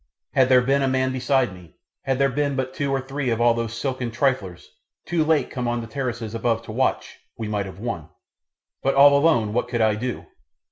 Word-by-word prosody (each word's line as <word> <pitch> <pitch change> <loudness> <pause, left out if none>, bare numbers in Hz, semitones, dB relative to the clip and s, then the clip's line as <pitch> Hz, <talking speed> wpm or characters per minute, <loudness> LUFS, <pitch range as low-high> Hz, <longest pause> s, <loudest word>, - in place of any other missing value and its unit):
Had 130 -2 +4
there 125 -1 +6
been 135 +2 +2
a 135 - +2
man 130 0 +1
beside 130 -3 +1
me, 90 -3 -15 0.3
had 135 -1 0
there 140 0 +3
been 140 +1 -1
but 130 -1 -2
two 140 0 -2
or 135 - +1
three 135 0 -3
of 115 -1 0
all 120 0 +4
those 115 -1 -3
silken 130 -3 -2
triflers, 115 -8 -1 0.4
too 170 -2 +1
late 155 -1 +1
come 125 -2 -3
on 120 0 0
the - - -6
terraces 115 -3 -4
above 115 0 0
to 115 - -8
watch, 130 +4 -1 0.2
we 110 - -4
might 105 -2 -2
have 95 -1 -10
won. 100 -8 -5 0.7
But 135 - +1
all 140 +1 +7
alone 140 -8 +3
what 120 +1 0
could 120 -1 -2
I 110 -1 +4
do? 120 +4 -4
125 Hz, 220 wpm, -23 LUFS, 115-135 Hz, 0.7 s, all